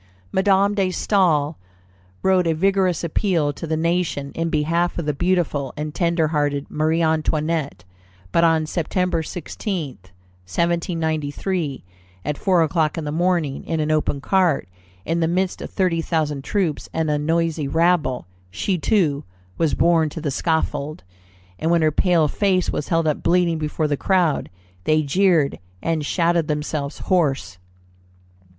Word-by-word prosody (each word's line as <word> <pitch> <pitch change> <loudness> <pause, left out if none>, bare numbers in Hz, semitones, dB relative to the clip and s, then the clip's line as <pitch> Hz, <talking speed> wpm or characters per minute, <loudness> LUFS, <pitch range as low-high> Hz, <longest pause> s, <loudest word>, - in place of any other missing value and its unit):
Madame 195 +1 +3
de 195 -2 +1
Staël 175 -6 +2 0.7
wrote 185 -2 +3
a 165 - +2
vigorous 190 0 +1
appeal 165 -3 0
to 165 - -7
the 160 0 0
nation 165 -4 -1
in 165 0 -1
behalf 165 +3 0
of 170 - -3
the 150 - 0
beautiful 165 -5 0
and 150 0 -4
tenderhearted 155 -5 0
Marie 160 +2 +1
Antoinette; 155 - 0 0.5
but 170 - +3
on 165 -1 +3
Sept. 170 +1 -1
16, 180 0 -4 0.6
1793, 165 - -1 0.4
at 150 - -1
four 180 +1 +2
o'clock 155 -1 0
in 165 - -3
the 150 - -3
morning, 170 -4 0
in 165 - -2
an 155 0 0
open 155 -2 0
cart, 180 -1 +1 0.4
in 165 +2 0
the 165 - +2
midst 185 +2 -1
of - - -6
thirty 180 -3 0
thousand 150 -4 -1
troops 180 -3 -1
and 160 -1 0
a 150 - +1
noisy 165 -1 0
rabble, 160 - +1 0.2
she, 180 - -1
too, 155 -8 +1 0.4
was 160 -3 +2
borne 165 -2 +3
to 160 - -7
the 150 -3 -2
scaffold; 155 - -1 0.6
and 160 - 0
when 170 -1 +3
her 155 - +3
pale 165 0 +3
face 185 +2 +1
was 150 - -3
held 165 -1 +1
up 155 -2 0
bleeding 170 -2 +2
before 155 0 -1
the 145 - 0
crowd, 175 -1 +1 0.4
they 155 0 +3
jeered 165 -1 +2 0.2
and 165 -2 0
shouted 170 -2 +1
themselves 150 -1 -3
hoarse. 145 - 0
165 Hz, 145 wpm, -22 LUFS, 150-175 Hz, 0.7 s, Madame